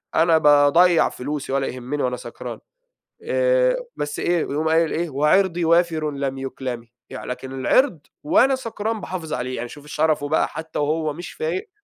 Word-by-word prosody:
أنا 165 0 +5
باضيّع 150 +4 +5
فلوسي 140 +1 -5
ولا 135 0 0
يهمّني 130 +3 -4
وأنا 125 0 -1
سكران - - -8 0.6
آآ، - - +2 0.2
بس 145 0 -4
إيه 175 0 +1
يقوم 155 +3 -2
قايل 165 0 +3
إيه: 170 +1 -1
"وعِرضي 170 +5 +2
وافرٌ 165 -2 +2
لم 140 -1 -3
يُكلمِ"، 130 -3 -5 0.2
لكن 130 0 -6
العِرض 190 - +3 0.2
وأنا 295 -3 +4
سكران 225 -3 -4
باحافظ 165 -4 -5
عليه، 125 -1 -3
يعني 120 0 -5
شوف 145 +3 -12
الشرفه 150 0 0
بقى 160 - +2
حتى 160 0 -6
وهو 155 +1 0
مش 175 +3 -8
فايق 165 +4 -3
155 Hz, 155 wpm, -22 LUFS, 140-175 Hz, 0.6 s, أنا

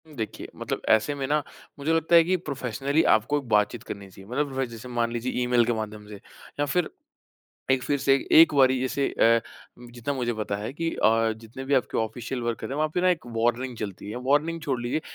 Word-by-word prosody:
देखिए, 110 -4 -5
मतलब - - -4
ऐसे 110 +6 +3
में 140 -1 -3
ना 150 +1 +1 0.4
मुझे 150 +3 0
लगता 165 +1 +3
है 165 - +8
कि 185 +3 +1
प्रोफ़ेशनली 140 -1 -1
आपको 120 +7 0
बात-चीत 105 +2 +2
करनी 100 -1 -8
चाहिए। 95 +2 -15
मतलब 140 +2 -1
व - - +2
जैसे 115 0 -10
मान 120 -1 0
लीजिए 120 +2 -2
ईमेल 125 -1 +3
के 120 - +1
माध्यम 105 -1 -6
से, 105 - -9 0.4
या 145 - +2
फिर 160 +3 0 0.8
एक 130 -1 +3
फिर 145 +1 0
से 135 0 +3 0.3
1 165 -2 +6
बारी 130 -2 +5
जैसे 135 +2 0
अ, 115 0 +4 0.5
जितना 120 +4 -3
मुझे 125 -3 -1
पता 105 -2 -3
है 105 +5 -5
कि 165 +3 -2
अ, 115 +1 +3
जितने 115 +4 -9
भी 140 +1 +1
आपके 130 - +1
ऑफ़िशियल 120 +3 -3
वर्क 120 -1 -3
है - - -4
वहाँ 155 +2 +1
पे 180 - +1
ना 185 - +3
1 165 -8 -2
वार्निंग 120 +2 0
चलती 100 -2 -6
है। 110 - -5
वार्निंग 160 +4 +2
छोड़ 135 -5 -1
लीजिए 120 +6 -1
125 Hz, 215 wpm, -26 LUFS, 115-145 Hz, 0.8 s, है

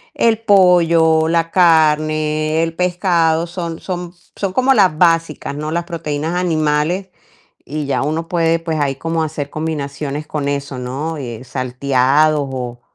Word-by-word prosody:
el 225 -1 +2
pollo, 170 -6 +4
la 165 0 +1
carne, 155 -2 +2
el 165 0 -3
pescado 175 -2 +1
son 170 -2 -5
son 175 -2 -5 0.2
son 195 -2 -2
como 260 +3 +3
las 185 -9 +3
básicas, 165 -4 +1
¿no? 150 +1 -4
Las 170 +1 -2
proteínas 160 -1 -3
animales 165 +2 0 0.6
y 150 0 -4
ya 135 -2 -1
uno 160 +3 -2
puede, 165 -1 +1
pues, 160 -2 -3
ahí 135 -2 0
como 165 +2 -2
hacer 150 -2 -4
combinaciones 150 -1 -4
con 145 -2 -3
eso, 140 -2 -4
¿no? 140 +6 -4
Eh, 120 -3 -7
salteados, 135 +3 +1
o 120 -2 -6
160 Hz, 145 wpm, -17 LUFS, 145-170 Hz, 0.6 s, pollo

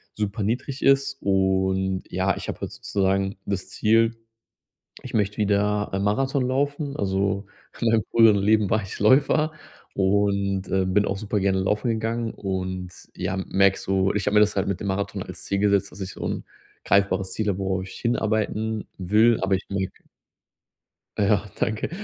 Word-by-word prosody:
super 105 +1 -2
niedrig 125 +5 -2
ist 135 0 +3
und 95 -1 +1
ja, 95 +1 0
ich - - -7
habe - - -5
halt - - -4
sozusagen 95 0 -1
das 100 -2 -3
Ziel, 115 +1 +2 0.9
ich - - -8
möchte 105 -1 +1
wieder 105 0 +1
ein 95 0 -1
Marathon 130 +5 +1
laufen, 140 +2 -1
also 100 0 -1 0.3
in 120 - +2
meinem 115 -1 +3
früheren 115 -2 +6
Leben 105 0 +2
war 110 +1 +2
ich 95 - -8
Läufer 145 +7 +4 0.4
und, 100 -1 +1
äh, 95 -1 +1
bin 100 +2 +2
auch 100 - -2
super 105 0 -2
gerne 95 0 +1
laufen 105 +5 0
gegangen 115 +1 -1
und 95 -2 -4 0.3
ja, 95 +1 -2
merke 95 0 +2
so 95 0 0
ich 105 - -1
habe 105 - +1
mir 105 - +6
das 105 -1 +3
halt 95 0 0
mit 100 -1 -2
dem 105 - -4
Marathon 95 +1 -2
als - - -8
Ziel 100 - -1
gesetzt, 100 -2 +2
dass 95 - -12
ich 95 0 -5
so - - -7
'n - - -3 0.4
greifbares 95 -1 +2
Ziel 110 +1 -2
habe, 100 -2 0
worauf 95 -1 -1
ich 95 - -10
hinarbeiten 110 -2 -1
will, 105 +5 +4
aber 95 0 +2
ich 95 - -8
merke 95 -1 -4 1.2
Ja, 100 -2 +2 0.2
danke. 110 -1 -1
100 Hz, 175 wpm, -24 LUFS, 95-110 Hz, 1.2 s, früheren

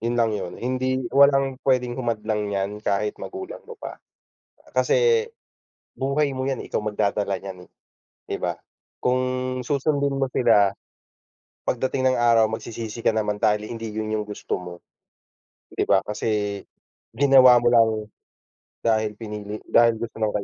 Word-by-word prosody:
Yun 120 +2 -1
lang 115 -2 +2
yun, 95 -4 -4
hindi 130 +1 -1
walang 135 -1 +4
pwedeng 125 -1 +1
humadlang 110 -3 -2
nyan 100 0 -1
kahit 105 0 0
magulang 380 0 -7
mo 470 - -10
pa. - - -8 0.7
Kasi, 470 -1 +3 0.7
buhay 140 +2 +1
mo 130 0 -3
'yan, 135 -2 -2
ikaw - - -2
magdadala 105 -1 -1
nyan 95 -2 -9
eh, - - -46 0.6
'di - - -2
ba? - - -2 0.5
Kung 125 +1 +1 0.4
susundin 140 0 0
mo 135 - +1
sila, 105 -5 +4 0.9
pagdating 130 +1 0
ng - - -1
araw 115 -2 +5
magsisisi 110 +1 -6
ka - - +4
naman 105 -1 -2
dahil 105 -1 +2
hindi 115 -1 -6
yun 110 0 -3
yung 105 - 0
gusto 105 - -4
mo. 90 -1 -8 1.0
'Di - - +1
ba 95 - +4
kasi, 105 -1 -2 0.5
ginawa 130 -1 +6
mo 120 - 0
lang 115 -2 +5 1.0
dahil 110 -2 +1
pinili 105 -2 -6
dahil 115 -1 +4
gusto 115 0 -6
ng 110 - +2
115 Hz, 145 wpm, -24 LUFS, 105-130 Hz, 1.0 s, ginawa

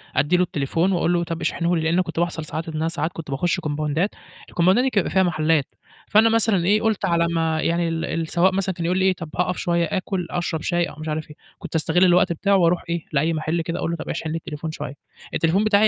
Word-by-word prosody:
أدّي 170 +5 +3
له 180 - +3
التليفون 165 +3 0
وأقول 175 -1 +1
له 170 - +1
طَب 165 0 -5
اشحنه 170 +1 0
لي، 165 - 0
لإنه 170 +3 +2
كنت 165 -1 -5
بيحصل 170 -2 -1
ساعات 160 +2 -5
إن - - -7
أنا 160 +1 0
ساعات 165 0 -2
كنت 155 -4 -7
باخُش 175 +7 0
كومباوندات، 155 +3 -1 0.4
الكومباوندات 185 +8 +3
دي 265 - +2
كان 205 -6 +1
بيبقى - - -4
فيها 190 - +4
محلّات، 155 -4 +2 0.4
فأنا 220 +2 +5
مثلًا 220 -5 +2
إيه، 210 +3 +3
قُلت 220 -3 0
على 170 -2 +2
ما 160 -1 0
يعني 170 0 +1
ال 165 0 -2
السواق 170 +3 +1
مثلًا 190 -1 -1
كان 170 -1 -4
يقول 180 +2 +1
لي 190 - +2
إيه: 190 - +4
"طَب 165 -4 -8
هاقف 180 0 0
شوية 170 -1 +1
آكُل 185 -2 -2
أشرب 170 -3 -2
شاي،" 175 -1 +1
أو - - -11
مش 155 - -6
عارف 155 0 -3
إيه، 150 - -12 0.2
كنت - - -8
أستغِل 160 +3 +2
الوقت 175 -1 +4
بتاعه 200 +4 +1
وأروح 175 -1 +2
إيه، 170 -1 -2
لأي 155 +4 +2
محل 160 +2 -1
كده 170 +1 -4
أقول 170 - -1
له: 170 - -2
"طَب - - -7
اشحن 160 0 -3
لي 165 - -1
التليفون 155 0 -6
شوية." 150 - -6 0.4
التليفون 175 +6 +2
بتاعي 215 0 +4
170 Hz, 250 wpm, -22 LUFS, 160-185 Hz, 0.4 s, فأنا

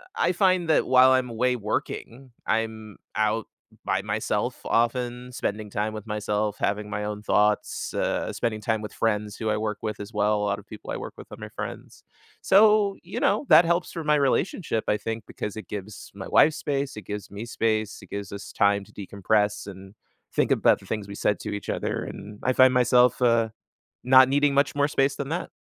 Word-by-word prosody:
I - - +2
find 185 -2 +2
that 155 - +3
while 130 0 +6
I'm 130 -1 +2
away 125 +2 +1
working, 120 +3 -4 0.2
I'm 110 -1 -2 0.2
out 110 +1 +1 0.4
by - - 0
myself - - -2
often, 125 +1 0
spending 105 -3 -3
time 105 +2 -2
with 110 0 -8
myself, 105 -1 -1
having 105 +1 -1
my 105 0 -3
own 105 0 -4
thoughts, 105 0 +1
uh, - - -1
spending 110 -2 -2
time 110 0 -1
with 105 - -7
friends 105 -2 -1
who 110 - -3
I 105 - +1
work 105 -1 -3
with 110 -1 -4
as 105 +2 -8
well. 105 0 +2
A 105 - -1
lotta 100 0 -2
people 105 0 -12
I - - -3
work - - -7
with - - -11
are - - -8
my - - -8
friends. - - -8 0.4
So, 210 0 +5
you 180 +2 -5
know, 210 +8 +1
that 165 +3 +8
helps 170 +1 0
for 165 - -5
my 150 0 +4
relationship, 145 - 0
I 105 - +3
think, 115 0 -5
because 105 - -6
it 110 - -8
gives 105 0 -7
my 95 - -7
wife 155 - +5
space, 140 -3 -3
it 105 - -9
gives 105 0 -6
me 105 +3 -7
space, 110 -2 -1
it - - -15
gives 100 -1 -6
us 100 0 -8
time 100 -1 +2
to - - -21
decompress 105 +1 -1
and 95 0 -10 0.4
think - - +1
about - - +4
the - - -16
things 105 -2 -4
we 100 - -8
said 105 - +1
to - - -5
each 100 - -7
other, - - -2
and 105 +1 -9
I 130 - +2
find 130 0 +6
myself, 125 0 +4
uh, 115 -2 +3 0.6
not 130 0 +7
needing 145 +1 +3
much 140 +1 +2
more 145 0 +2
space 135 -1 +1
than 140 - -4
that. 175 +3 -3
110 Hz, 205 wpm, -25 LUFS, 105-130 Hz, 0.6 s, that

